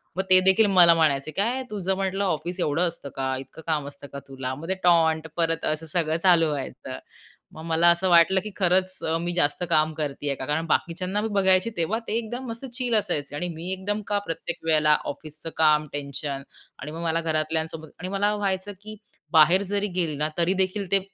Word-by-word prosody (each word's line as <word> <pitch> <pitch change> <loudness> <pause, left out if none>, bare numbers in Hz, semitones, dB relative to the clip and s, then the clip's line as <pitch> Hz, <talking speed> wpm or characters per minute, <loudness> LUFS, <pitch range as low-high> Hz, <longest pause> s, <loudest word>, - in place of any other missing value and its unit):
मग 190 - -1
तेदेखील 190 +3 +6
मला 170 -1 +9
म्हणायचे, 155 -2 +1
"काय 235 - -1
तुझं 190 -2 -1
म्हटलं 195 +1 -1
ऑफिस 175 +1 -2
एवढं 170 +2 +1
असतं 165 -4 -7
का? 130 0 -1
इतकं 135 +4 -11
काम 150 -3 0
असतं 140 0 -10
का 140 - -5
तुला?" 130 -1 -5
मग 165 +6 -6
टॉन्ट 160 -2 +3
परत 165 -1 0
असं 155 +1 -2
सगळं 160 0 0
चालू 170 -3 +5
व्हायचं. 130 - -5 0.6
मग 160 - -9
मला 165 +1 +3
असं 180 +2 +1
वाटलं 175 +2 +5
की 210 - -6
खरंच 185 0 +1
अ, 160 +1 0
मी 175 0 -2
जास्त 145 +1 +1
काम 155 -1 +3
करती 145 -2 -4
आहे 140 - -1
का? 130 - -6
कारण 160 +3 -1
बाकीच्यांना 185 +6 -1
मी 220 - -1
बघायची 190 +1 +3
तेव्हा 180 +7 0
ते - - -3
एकदम 240 +3 -5
मस्त 230 +4 -6
चिल 245 -3 -1
असायचे 145 -8 -1
आणि 175 +4 -3
मी 175 +3 -5
एकदम 205 +3 -3
का 205 - 0
प्रत्येक 165 +1 -4
वेळेला 155 -1 +4 0.2
ऑफिसचं 155 +2 -9
काम, 155 -1 +4
टेन्शन 140 -1 -5 0.4
आणि 150 +3 -7
मग 165 +1 -7
मला 165 0 0
घरातल्यांसोबत 160 0 -2
आणि 180 +2 -5
मला 205 +1 +1
व्हायचं, 195 -1 -2
की 215 0 -9 0.4
बाहेर 170 +5 +6
जरी 205 +1 0
गेली 160 -4 0
ना 150 +1 0
तरीदेखील 190 +2 0
ते 195 - +5
165 Hz, 195 wpm, -25 LUFS, 155-190 Hz, 0.6 s, मला